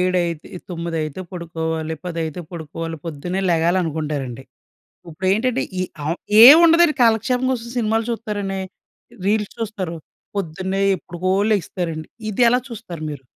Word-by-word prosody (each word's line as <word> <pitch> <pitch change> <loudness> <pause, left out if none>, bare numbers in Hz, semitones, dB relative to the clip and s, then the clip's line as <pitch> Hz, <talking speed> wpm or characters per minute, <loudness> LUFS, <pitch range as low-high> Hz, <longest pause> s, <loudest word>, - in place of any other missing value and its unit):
ఏడైతే 175 -3 0
ఇ - - -6
తొమ్మిదైతే 165 -2 -3
పడుకోవాలి. 160 -2 -3
పదైతే 165 -2 -3
పడుకోవాలి. 165 0 -5
పొద్దున్నే 170 +4 -3
లెగాలనుకుంటారండి. 155 -7 0 0.6
ఉప్పుడేంటంటే, 200 +10 0 0.2
ఈ - - +2 0.2
ఆం 160 +3 0 0.3
ఏవుండదండి 330 +3 +8
కాలక్షేపం 240 +3 +3
కోసం 235 -2 -4
సినిమాలు 225 0 +1
చూత్తారండి. 205 -4 -3 0.7
రీల్స్ 210 0 +1
చూస్తారు. 200 -7 -4 0.4
పొద్దున్నే 190 +2 -2 0.2
ఎప్పుడుకో 180 +1 -4 0.2
లెగిస్తారండి. 165 -5 -2 0.2
ఇది 215 +4 0
ఎలా 245 - +4
చూస్తారు 205 -9 -8
మీరు? 140 -2 -7
180 Hz, 110 wpm, -21 LUFS, 160-215 Hz, 0.7 s, ఏవుండదండి